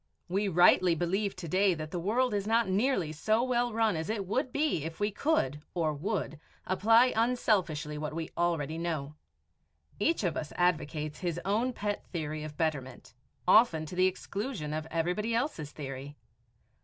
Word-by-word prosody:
We 195 +4 0
rightly 180 -1 +5
believe 190 +5 -1
to 185 -2 -7
day 185 +2 +3
that 155 -1 -6
the 180 - -2
world 230 +7 +1
is 200 0 -1
not 230 0 +3
nearly 190 - +1
so 215 +9 +1
well 245 -1 +1
run 220 -3 +2
as 160 +3 -3
it 210 -3 -2
would 255 +7 -1
be 290 - 0
if 160 +1 -6
we 205 +1 +1
could 170 - 0
or 160 -3 +1
would 160 -1 -3 0.3
apply 225 +6 +4
unselfishly 190 -11 +1
what 150 0 -4
we 165 -1 -4
already 165 -2 0
know. 155 -4 -3 0.9
Each 315 +5 +1
of 175 -4 0
us 150 - -4
advocates 155 -3 0
his 175 -2 -2
own 220 +6 +1
pet 205 -3 -3
theory 155 -3 -3
of 150 -1 -8
betterment, 135 -8 -3 0.3
often 180 -6 +5
to 155 - -8
the 185 +1 +4
exclusion 190 - -4
of 155 +1 -3
everybody 180 +8 -1
else's 230 - -2
theory. 140 0 -7
180 Hz, 170 wpm, -30 LUFS, 155-215 Hz, 0.9 s, rightly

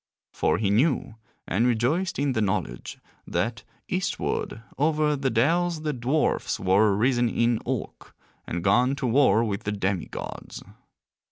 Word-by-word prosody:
For - - +1
he 105 -2 0
knew, 125 +2 +1 0.3
and 115 +6 +2
rejoiced 130 +11 0
in 140 0 +1
the 110 - 0
knowledge, 95 - -2 0.3
that - - -2 0.2
eastward 115 - -2
over 150 0 +1
the 135 -1 -1
dells 165 +7 +1
the 150 -1 -1
dwarfs 130 +5 0
were 100 +2 +3
risen 120 +1 +2
in 115 0 +1
Ulk, - - -5 0.3
and 85 0 -3
gone 125 +7 +3
to 140 - -4
war 125 -2 +4
with 100 -3 -2
the 100 - -3
demi 100 -3 -1
gods. - - -8
120 Hz, 145 wpm, -25 LUFS, 105-145 Hz, 0.3 s, war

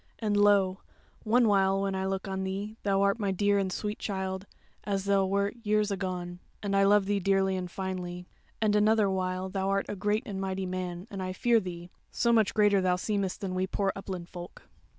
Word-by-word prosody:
And 210 -2 -1
lo, 200 -2 +4 0.4
one 235 +2 +4
while 195 -1 +3
when 195 0 -1
I 190 0 -1
look 195 0 -3
on 190 0 -3
thee 200 +3 -4
thou 195 -1 +2
art 200 +3 +2
my 200 -2 0
dear 205 +1 +2
and 190 -1 -1
sweet 210 +2 -3
child, 190 -1 -3 0.4
as 195 -1 -2
thou 200 -1 +3
wert 200 +3 0
years 210 -1 +1
agone, 180 -2 -4 0.2
and 200 -1 0
I 195 0 +5
love 205 0 +5
thee 205 0 +1
dearly 195 0 +2
and 180 -1 -4
finely; 180 -1 -5 0.3
and 215 -2 +2
another 210 -1 +4
while 185 0 -1
thou 190 0 -2
art 195 0 +1
a - - -4
great 210 +4 0
and 195 -5 -4
mighty 190 0 -2
man, 180 -1 -4
and 195 -2 -5
I 185 0 -3
fear 235 +4 +3
thee; 175 -2 -7 0.2
so 235 -1 +1
much 220 -3 +3
greater 205 -2 +4
thou 180 -1 +2
seemest 195 0 -2
than 190 -2 -3
we 185 +1 0
poor 195 0 0
upland 185 -3 -6
folk." 175 -1 -10
195 Hz, 210 wpm, -29 LUFS, 185-205 Hz, 0.4 s, I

